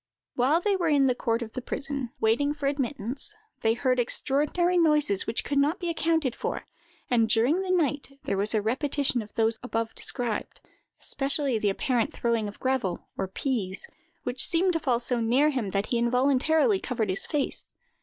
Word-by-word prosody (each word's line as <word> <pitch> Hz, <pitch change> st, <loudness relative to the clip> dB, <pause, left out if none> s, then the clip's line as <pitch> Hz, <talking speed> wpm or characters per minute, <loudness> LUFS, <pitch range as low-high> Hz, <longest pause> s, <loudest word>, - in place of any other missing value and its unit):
While 275 Hz, +7 st, +2 dB
they 405 Hz, +1 st, +2 dB
were 350 Hz, -3 st, 0 dB
in 285 Hz, -3 st, +4 dB
the 255 Hz, -, +3 dB
court 235 Hz, -1 st, -1 dB
of 220 Hz, -, -10 dB
the 255 Hz, -, -4 dB
prison, 275 Hz, 0 st, -4 dB
waiting 285 Hz, +7 st, +2 dB
for 290 Hz, -2 st, -5 dB
admittance, 275 Hz, -, 0 dB, 0.3 s
they 225 Hz, 0 st, +2 dB
heard 255 Hz, 0 st, +1 dB
extraordinary 295 Hz, +8 st, 0 dB
noises, 300 Hz, -, +3 dB
which 225 Hz, -, -1 dB
could 280 Hz, 0 st, 0 dB
not 300 Hz, +7 st, +1 dB
be 350 Hz, -3 st, -1 dB
accounted 320 Hz, -5 st, +1 dB
for, -, -, -4 dB, 0.5 s
and 230 Hz, -2 st, +3 dB
during 245 Hz, +11 st, +3 dB
the 380 Hz, -, -4 dB
night 290 Hz, -6 st, 0 dB
there -, -, -1 dB
was 205 Hz, +3 st, 0 dB
a 210 Hz, -, +1 dB
repetition 265 Hz, +2 st, +1 dB
of 210 Hz, -1 st, -11 dB
those 225 Hz, 0 st, +1 dB
above 225 Hz, -2 st, -3 dB
described—especially 260 Hz, +3 st, -2 dB
the 210 Hz, -, +1 dB
apparent 235 Hz, +4 st, 0 dB
throwing 230 Hz, -2 st, 0 dB
of 205 Hz, -, -9 dB
gravel, 260 Hz, -9 st, -1 dB
or 195 Hz, -, -2 dB
peas, 200 Hz, -, -2 dB, 0.4 s
which 245 Hz, +1 st, -1 dB
seemed 360 Hz, +1 st, +2 dB
to 330 Hz, -, +1 dB
fall 250 Hz, -6 st, +1 dB
so 245 Hz, 0 st, -1 dB
near 250 Hz, +6 st, +3 dB
him 250 Hz, -8 st, -2 dB
that 195 Hz, +1 st, -1 dB
he 240 Hz, -, 0 dB
involuntarily 280 Hz, -, +3 dB
covered 230 Hz, -, -2 dB
his 185 Hz, -, -2 dB
face. 290 Hz, -3 st, -2 dB
255 Hz, 180 wpm, -27 LUFS, 230-295 Hz, 0.5 s, in